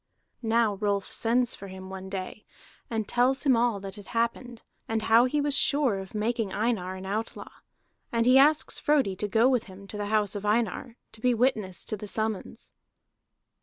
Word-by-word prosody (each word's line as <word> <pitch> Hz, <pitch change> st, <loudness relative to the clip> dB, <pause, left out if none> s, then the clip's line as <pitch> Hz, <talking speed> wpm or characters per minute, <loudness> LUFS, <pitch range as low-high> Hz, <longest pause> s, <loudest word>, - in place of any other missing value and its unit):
Now 225 Hz, -2 st, +2 dB
Rolf 200 Hz, -1 st, -1 dB
sends 240 Hz, +1 st, +1 dB
for 200 Hz, -, -9 dB
him 190 Hz, 0 st, -9 dB
one 190 Hz, 0 st, -7 dB
day, 190 Hz, +2 st, -6 dB, 0.5 s
and 220 Hz, -3 st, -2 dB
tells 255 Hz, +3 st, +2 dB
him 270 Hz, -4 st, +4 dB
all 230 Hz, -3 st, +1 dB
that 195 Hz, +1 st, -8 dB
had 205 Hz, -, -11 dB
happened, 235 Hz, +1 st, -2 dB, 0.2 s
and 225 Hz, -1 st, -1 dB
how 225 Hz, +2 st, +5 dB
he 295 Hz, +4 st, 0 dB
was 290 Hz, 0 st, 0 dB
sure 280 Hz, -8 st, +2 dB
of 190 Hz, +2 st, -9 dB
making 220 Hz, -1 st, -1 dB
Einar 205 Hz, -4 st, -1 dB
an 190 Hz, 0 st, -8 dB
outlaw. 215 Hz, +4 st, -4 dB, 0.6 s
And 230 Hz, -1 st, +1 dB
he 255 Hz, +2 st, +7 dB
asks 300 Hz, +2 st, +3 dB
Frodi 280 Hz, -10 st, +2 dB
to 210 Hz, -, -2 dB
go 225 Hz, +4 st, +3 dB
with 255 Hz, -3 st, +1 dB
him 195 Hz, 0 st, -12 dB
to 210 Hz, -, -7 dB
the 205 Hz, -, -2 dB
house 210 Hz, -2 st, +1 dB
of 205 Hz, -, -5 dB
Einar, 225 Hz, +2 st, -1 dB, 0.2 s
to 220 Hz, -, -15 dB
be 250 Hz, 0 st, +3 dB
witness 220 Hz, -7 st, 0 dB
to -, -, -3 dB
the 210 Hz, -, -8 dB
summons. 215 Hz, 0 st, -4 dB
220 Hz, 190 wpm, -27 LUFS, 200-245 Hz, 0.6 s, he